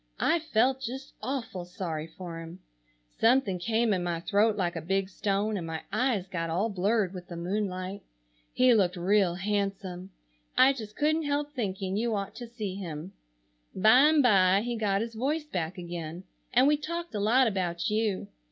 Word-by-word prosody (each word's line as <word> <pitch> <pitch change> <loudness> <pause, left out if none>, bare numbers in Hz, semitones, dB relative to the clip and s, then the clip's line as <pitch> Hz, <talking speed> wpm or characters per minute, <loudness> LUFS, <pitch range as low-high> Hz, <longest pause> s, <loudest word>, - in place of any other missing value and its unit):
I 335 - +3
felt 265 -3 +1
just 265 +2 -6
awful 235 -9 -4
sorry 170 -3 -5
for 170 -1 -8
him. 165 +2 -9 0.6
Something 225 -6 +3
came 225 +3 +1
in 185 - 0
my 170 -1 -1
throat 210 +4 +2
like 175 -4 -1
a 165 - -3
big 190 +3 0
stone 205 +2 -1
and 170 -3 -5
my 160 -1 -5
eyes 245 -8 +1
got 170 -3 -3
all 190 +8 0
blurred 200 0 +1
with 180 -1 -8
the 175 - -7
moonlight. 185 +1 -3 0.5
He 255 -1 +5
looked 190 -5 +3
real 185 0 +2
handsome. 195 -1 -2 0.5
I 270 +1 +7
just 215 -5 -8
couldn't 310 +1 +1
help 290 0 -1
thinking 195 -6 -2
you 230 0 0
ought 200 -1 -3
to 240 - -7
see 220 -5 -5
him. 175 -2 -6 0.6
Bimeby 220 -4 +5
he 240 -1 -2
got 205 -3 +1
his 230 0 -4
voice 290 +7 -1
back 180 - -3
again, 170 -1 -6 0.3
and 255 +1 +5
we 295 +1 +4
talked 335 +1 -5
a 210 - -2
lot 235 +6 +4
about 180 -4 -1
you. 210 - 0
200 Hz, 170 wpm, -28 LUFS, 180-240 Hz, 0.6 s, I